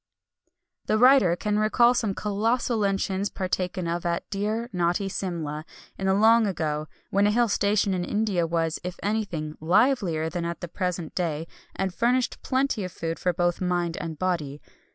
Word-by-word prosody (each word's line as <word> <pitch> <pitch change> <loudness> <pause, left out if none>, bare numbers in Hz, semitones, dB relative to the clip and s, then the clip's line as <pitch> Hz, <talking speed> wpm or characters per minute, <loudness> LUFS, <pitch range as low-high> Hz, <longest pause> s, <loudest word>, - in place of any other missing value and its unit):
The 215 - +2
writer 250 -8 +6
can 210 +3 -1
recall 235 +3 +4
some 215 -5 -1
colossal 225 +3 0
luncheons 195 0 0
partaken 185 -1 -2
of 170 +1 -2
at 170 0 -2
dear, 215 +4 -1
naughty 175 +2 0
Simla, 165 -6 -4 0.3
in 190 - -3
the 190 - +3
long 225 +2 +5
ago, 155 -4 -2 0.2
when 200 +1 +3
a - - +3
hill 240 +2 +3
station 205 -1 +1
in 180 -1 -1
India 205 -4 0
was, 165 -1 -1
if 180 0 -6
anything, 190 -8 -2
livelier 180 - +2
than 170 +1 -3
at 170 0 -4
the 175 - -5
present 175 -2 -3
day, 165 -3 -2 0.3
and 190 -2 -2
furnished 245 +4 +1
plenty 260 -5 0
of 185 - -5
food 165 0 -4
for 180 - +1
both 175 +1 0
mind 175 -2 0
and 160 -2 -5
body. 155 -6 -2
185 Hz, 170 wpm, -26 LUFS, 170-210 Hz, 0.3 s, writer